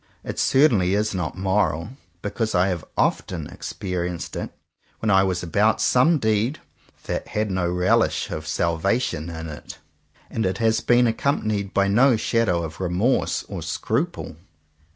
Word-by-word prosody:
It -, -, -5 dB
certainly 110 Hz, -10 st, +4 dB
is 105 Hz, +1 st, 0 dB
not 90 Hz, -2 st, -3 dB
moral, 95 Hz, -3 st, 0 dB, 0.3 s
because 110 Hz, +1 st, -2 dB
I 90 Hz, +2 st, +3 dB
have 85 Hz, -4 st, -3 dB
often 85 Hz, -5 st, 0 dB
experienced 90 Hz, 0 st, -5 dB
it -, -, -4 dB, 0.5 s
when 110 Hz, -, 0 dB
I 95 Hz, 0 st, +6 dB
was 95 Hz, -2 st, 0 dB
about 105 Hz, +6 st, +2 dB
some 145 Hz, +7 st, +4 dB
deed 110 Hz, +3 st, +1 dB, 0.5 s
"that -, -, -3 dB
had 105 Hz, -1 st, -2 dB
no 95 Hz, -2 st, 0 dB
relish 90 Hz, +1 st, +1 dB
of 75 Hz, 0 st, -5 dB
salvation 85 Hz, +1 st, 0 dB
in't/' 80 Hz, -3 st, -7 dB, 0.6 s
and 115 Hz, -, -1 dB
it 95 Hz, -1 st, 0 dB
has 110 Hz, 0 st, +2 dB
been 120 Hz, 0 st, +4 dB
accompanied 110 Hz, -4 st, 0 dB
by 100 Hz, 0 st, +2 dB
no 120 Hz, +6 st, +5 dB
shadow 110 Hz, -7 st, +1 dB
of 80 Hz, -1 st, -7 dB
remorse 95 Hz, +8 st, +1 dB
or -, -, -6 dB
scruple. 115 Hz, -, -2 dB
100 Hz, 145 wpm, -23 LUFS, 90-110 Hz, 0.6 s, I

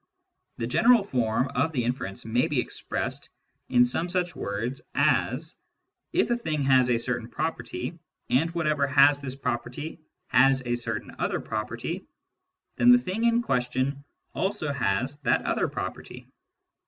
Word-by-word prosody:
The 115 Hz, -, -2 dB
general 230 Hz, -, +5 dB
form 125 Hz, -, 0 dB
of 140 Hz, +5 st, 0 dB
the 125 Hz, -4 st, 0 dB
inference 120 Hz, -6 st, -3 dB
may 120 Hz, +3 st, +1 dB
be -, -, 0 dB
expressed -, -, -4 dB, 0.4 s
in 125 Hz, -1 st, +5 dB
some 160 Hz, +8 st, -2 dB
such 180 Hz, -1 st, -1 dB
words 115 Hz, +6 st, -3 dB
as, -, -, +1 dB, 0.3 s
" -, -, -56 dB
If -, -, +2 dB
a 240 Hz, -, +2 dB
thing 155 Hz, -10 st, -2 dB
has 130 Hz, -2 st, +4 dB
a 120 Hz, -, +3 dB
certain 120 Hz, 0 st, -2 dB
property, 155 Hz, 0 st, -4 dB, 0.3 s
and 155 Hz, +6 st, +2 dB
whatever 150 Hz, -4 st, +1 dB
has 140 Hz, +1 st, +5 dB
this 135 Hz, -2 st, -4 dB
property 135 Hz, +5 st, -4 dB, 0.3 s
has 130 Hz, 0 st, +4 dB
a 120 Hz, -, 0 dB
certain 115 Hz, -2 st, -4 dB
other -, -, 0 dB
property, 115 Hz, -, -4 dB, 0.7 s
then 245 Hz, -, +6 dB
the 245 Hz, -, +9 dB
thing 225 Hz, 0 st, -2 dB
in 235 Hz, 0 st, +3 dB
question 130 Hz, -, -1 dB, 0.3 s
also 190 Hz, -7 st, -1 dB
has 130 Hz, +5 st, -1 dB
that 150 Hz, -, +1 dB
other -, -, +1 dB
property." -, -, -6 dB
135 Hz, 150 wpm, -27 LUFS, 120-160 Hz, 0.7 s, the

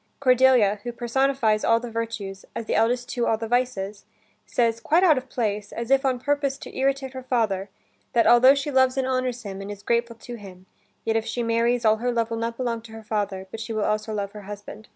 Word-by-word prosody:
Cordelia, 255 Hz, -6 st, +4 dB
who 240 Hz, -, -4 dB
personifies 240 Hz, -2 st, +1 dB
all 230 Hz, 0 st, +4 dB
the 240 Hz, 0 st, -7 dB
virtues, 220 Hz, -4 st, -4 dB
as 230 Hz, -, -4 dB
the -, -, -2 dB
eldest 245 Hz, +2 st, +1 dB
two 240 Hz, -1 st, -1 dB
all 225 Hz, -, +2 dB
the 225 Hz, 0 st, -5 dB
vices, 220 Hz, -5 st, -1 dB, 0.4 s
says, 230 Hz, -1 st, +1 dB
quite 325 Hz, +9 st, +2 dB
out 330 Hz, -5 st, +6 dB
of 260 Hz, 0 st, -5 dB
place, 210 Hz, -3 st, -2 dB
as 235 Hz, +2 st, -5 dB
if 270 Hz, +1 st, +4 dB
on 260 Hz, -2 st, +1 dB
purpose 280 Hz, +1 st, 0 dB
to -, -, -11 dB
irritate 270 Hz, 0 st, 0 dB
her 260 Hz, -, -6 dB
father, 220 Hz, -6 st, 0 dB, 0.4 s
that 235 Hz, -, +4 dB
altho 255 Hz, +3 st, +7 dB
she 280 Hz, +1 st, -2 dB
loves 260 Hz, -1 st, +3 dB
and 265 Hz, -, +1 dB
honors 255 Hz, -1 st, -1 dB
him, 195 Hz, -2 st, -6 dB
and 195 Hz, -, -7 dB
is 205 Hz, -1 st, -8 dB
grateful 235 Hz, 0 st, 0 dB
to 240 Hz, +1 st, -9 dB
him, 190 Hz, -3 st, -12 dB, 0.4 s
yet 225 Hz, -, +1 dB
if 225 Hz, -, -2 dB
she 240 Hz, -, -2 dB
marries, 230 Hz, +1 st, +1 dB
all 220 Hz, 0 st, +5 dB
her 245 Hz, +2 st, -1 dB
love 230 Hz, -1 st, -1 dB
will 230 Hz, -, -2 dB
not 230 Hz, 0 st, -3 dB
belong 235 Hz, -3 st, -2 dB
to 225 Hz, 0 st, -13 dB
her 225 Hz, 0 st, -9 dB
father, 205 Hz, -3 st, -2 dB
but 225 Hz, -, -6 dB
she 225 Hz, +1 st, -5 dB
will 215 Hz, -1 st, 0 dB
also 215 Hz, +1 st, -1 dB
love 200 Hz, -2 st, -3 dB
her 210 Hz, 0 st, -9 dB
husband. 205 Hz, +1 st, -9 dB
230 Hz, 235 wpm, -24 LUFS, 215-255 Hz, 0.4 s, altho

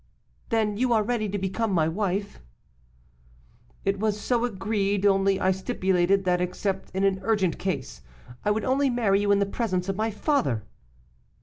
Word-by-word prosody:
'Then, 215 Hz, -2 st, +1 dB
you 250 Hz, +1 st, +1 dB
are 220 Hz, -2 st, +3 dB
ready 220 Hz, -2 st, -1 dB
to 205 Hz, -, -2 dB
become 200 Hz, +3 st, -1 dB
my 165 Hz, -4 st, +2 dB
wife?' 200 Hz, +3 st, -2 dB, 1.5 s
'It 195 Hz, 0 st, 0 dB
was 210 Hz, 0 st, 0 dB
so 240 Hz, +2 st, 0 dB
agreed; 200 Hz, -2 st, -1 dB
only 195 Hz, -1 st, +3 dB
I 190 Hz, -, +2 dB
stipulated 190 Hz, -2 st, +1 dB
that 180 Hz, -1 st, +2 dB
except 190 Hz, +2 st, -2 dB
in 190 Hz, -, 0 dB
an 195 Hz, -1 st, +2 dB
urgent 195 Hz, -5 st, 0 dB
case, 65 Hz, -, -4 dB, 0.4 s
I -, -, +1 dB
would 210 Hz, +1 st, 0 dB
only 270 Hz, +2 st, +2 dB
marry 215 Hz, -5 st, +2 dB
you 205 Hz, 0 st, +2 dB
in 200 Hz, -, +5 dB
the 200 Hz, -, +2 dB
presence 195 Hz, -3 st, -2 dB
of 195 Hz, -, -1 dB
my 220 Hz, +2 st, 0 dB
father. 210 Hz, -, 0 dB
200 Hz, 170 wpm, -26 LUFS, 190-220 Hz, 1.5 s, in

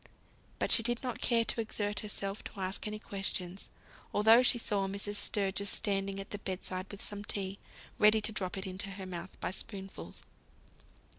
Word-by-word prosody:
But -, -, +1 dB
she -, -, +9 dB
did 240 Hz, +2 st, +1 dB
not 250 Hz, -2 st, -3 dB
care 230 Hz, -1 st, +4 dB
to 230 Hz, -, +1 dB
exert 210 Hz, -1 st, -1 dB
herself 200 Hz, -1 st, -3 dB
to -, -, -7 dB
ask 190 Hz, +2 st, -2 dB
any 210 Hz, 0 st, -3 dB
questions, 195 Hz, -3 st, -4 dB, 0.5 s
although 220 Hz, +3 st, +8 dB
she 250 Hz, -1 st, +4 dB
saw 205 Hz, -4 st, +1 dB
Mrs. 200 Hz, +1 st, 0 dB
Sturgis 200 Hz, 0 st, +2 dB
standing 195 Hz, -1 st, 0 dB
at 195 Hz, -, -7 dB
the 205 Hz, -, -3 dB
bed 190 Hz, -2 st, -4 dB
side 185 Hz, +1 st, -3 dB
with 200 Hz, +1 st, -7 dB
some 205 Hz, 0 st, -5 dB
tea, 195 Hz, -1 st, -3 dB, 0.4 s
ready 215 Hz, +1 st, +7 dB
to 215 Hz, +1 st, -1 dB
drop 195 Hz, -3 st, -2 dB
it 190 Hz, -, -4 dB
into 190 Hz, +1 st, -4 dB
her 195 Hz, -1 st, -6 dB
mouth 180 Hz, 0 st, -7 dB
by -, -, -1 dB
spoonfuls. 195 Hz, -1 st, -7 dB
200 Hz, 180 wpm, -33 LUFS, 195-215 Hz, 0.5 s, she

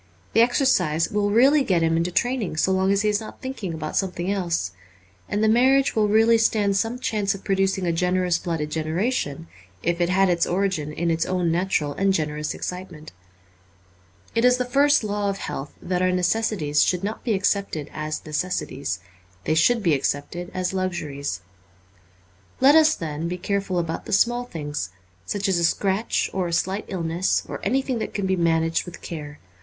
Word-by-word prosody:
The 225 Hz, -, +5 dB
exercise 235 Hz, -, +2 dB
will 205 Hz, 0 st, +1 dB
really 270 Hz, +7 st, +5 dB
get 180 Hz, -8 st, +1 dB
him 165 Hz, 0 st, +2 dB
into 165 Hz, +2 st, +1 dB
train 245 Hz, +8 st, 0 dB
ing 175 Hz, -6 st, -4 dB
so 190 Hz, -, +2 dB
long 190 Hz, +1 st, +2 dB
as 200 Hz, +1 st, +2 dB
he 210 Hz, -, +2 dB
is 210 Hz, +1 st, 0 dB, 0.2 s
thinking 260 Hz, -9 st, -5 dB
about 155 Hz, -1 st, -5 dB
something 185 Hz, -1 st, -1 dB
else. 170 Hz, -, -1 dB, 0.6 s
And 205 Hz, +1 st, 0 dB
the -, -, +4 dB
marriage 260 Hz, +5 st, +4 dB
will 215 Hz, -1 st, +3 dB
really 225 Hz, +2 st, +4 dB
stand 210 Hz, -3 st, +2 dB
some 225 Hz, +4 st, 0 dB
chance 210 Hz, -5 st, -1 dB
of 195 Hz, -, -11 dB
producing 195 Hz, -1 st, 0 dB
a 170 Hz, -, +1 dB
generous 180 Hz, +1 st, +1 dB
blooded 160 Hz, -3 st, -3 dB
generation 160 Hz, -, -2 dB, 0.4 s
if 170 Hz, 0 st, 0 dB
it 175 Hz, -, +2 dB
had 190 Hz, +1 st, +3 dB
its 175 Hz, -2 st, +1 dB
origin 180 Hz, -5 st, -1 dB
in 170 Hz, +2 st, -1 dB
its 165 Hz, 0 st, +1 dB
own 180 Hz, -2 st, 0 dB
natural 165 Hz, -4 st, 0 dB
and 195 Hz, +5 st, +1 dB
generous 150 Hz, -1 st, -2 dB
excitement. 180 Hz, -4 st, -7 dB, 1.2 s
It 230 Hz, -, +1 dB
is 250 Hz, 0 st, +5 dB
the 250 Hz, -, -1 dB
first 280 Hz, +1 st, +3 dB
law 205 Hz, -1 st, -1 dB
of 195 Hz, -, -2 dB
health 140 Hz, -6 st, -6 dB
that 180 Hz, 0 st, -1 dB
our 185 Hz, 0 st, +3 dB
necessities 180 Hz, -4 st, +1 dB
should 180 Hz, 0 st, +1 dB
not 210 Hz, +2 st, -4 dB
be 225 Hz, -4 st, +1 dB
accepted 195 Hz, -6 st, -1 dB
as 155 Hz, 0 st, -4 dB
necessities; 150 Hz, -, -3 dB, 0.4 s
they 155 Hz, -, 0 dB
should 225 Hz, +8 st, +3 dB
be 170 Hz, -4 st, +3 dB
accepted 145 Hz, +5 st, -2 dB
as 185 Hz, 0 st, -2 dB
luxuries. 150 Hz, -, -3 dB, 1.2 s
Let 270 Hz, +2 st, +6 dB
us, 315 Hz, 0 st, +6 dB
then, 160 Hz, -1 st, -4 dB
be 180 Hz, +1 st, -3 dB
careful 195 Hz, 0 st, -2 dB
about 165 Hz, -1 st, -2 dB
the -, -, -4 dB
small 240 Hz, +4 st, +2 dB
things, 145 Hz, -, -5 dB, 0.4 s
such 200 Hz, 0 st, -1 dB
as 190 Hz, -3 st, +2 dB
a -, -, 0 dB
scratch 195 Hz, +5 st, +1 dB
or 185 Hz, -2 st, -1 dB
a 170 Hz, -, -4 dB
slight 190 Hz, +4 st, -1 dB
illness, 175 Hz, -1 st, 0 dB
or -, -, -6 dB
anything 265 Hz, -2 st, 0 dB
that -, -, -5 dB
can 200 Hz, -, -1 dB
be 190 Hz, 0 st, +1 dB
managed 165 Hz, -1 st, +1 dB
with 175 Hz, -1 st, -10 dB
care. 150 Hz, -3 st, -7 dB
185 Hz, 185 wpm, -23 LUFS, 165-210 Hz, 1.2 s, Let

